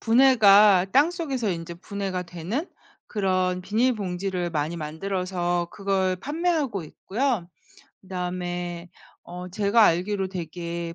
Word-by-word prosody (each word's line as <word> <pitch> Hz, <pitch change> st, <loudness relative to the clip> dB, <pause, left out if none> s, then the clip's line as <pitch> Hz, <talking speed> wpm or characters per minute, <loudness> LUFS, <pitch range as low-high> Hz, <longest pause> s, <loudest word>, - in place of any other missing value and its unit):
분해가 215 Hz, -6 st, +6 dB
땅속에서 280 Hz, -, +1 dB
인제 170 Hz, -1 st, -5 dB
분해가 190 Hz, 0 st, -4 dB
되는 180 Hz, -, -4 dB, 0.4 s
그런 185 Hz, -3 st, 0 dB
비닐봉지를 190 Hz, -4 st, -1 dB
많이 155 Hz, +1 st, -2 dB
만들어서 175 Hz, +2 st, -2 dB
그걸 195 Hz, -2 st, 0 dB
판매하고 295 Hz, -, -1 dB
있고요. 205 Hz, -, -2 dB, 0.5 s
그다음에 180 Hz, -2 st, -4 dB, 0.4 s
어 180 Hz, +1 st, -8 dB
제가 200 Hz, +4 st, +3 dB
알기로 190 Hz, +3 st, 0 dB
되게 170 Hz, -1 st, -5 dB
185 Hz, 265 characters per minute, -25 LUFS, 175-215 Hz, 0.5 s, 분해가